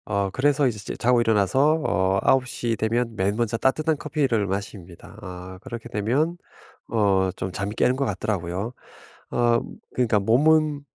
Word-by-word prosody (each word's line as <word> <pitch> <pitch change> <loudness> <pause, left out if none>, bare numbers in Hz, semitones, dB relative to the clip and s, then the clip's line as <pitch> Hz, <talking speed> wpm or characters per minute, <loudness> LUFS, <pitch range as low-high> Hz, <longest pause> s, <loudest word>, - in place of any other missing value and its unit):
어 100 -2 -1
그래서 140 +4 +2
이제 110 -4 -3
제 95 - -6
자고 120 0 +3
일어나서 115 - +3
어 95 -11 +1
9:00 125 -3 +1
되면 115 +1 -1
맨 100 +1 0
먼저 115 -1 -1
따뜻한 155 +5 +1
커피를 135 -9 0
마십니다. 95 -3 -6
아 90 +1 -9
그렇게 120 -3 -8
되면 130 +12 0 0.5
어 100 -4 +2
좀 95 - -4
잠이 100 +2 -4
깨는 125 - +2
것 140 +1 -1
같더라고요. 95 0 -3 0.6
어 120 -1 +3 0.3
그러니까 115 -4 +2
몸은 150 +7 +3
115 Hz, 295 characters per minute, -24 LUFS, 100-130 Hz, 0.6 s, 자고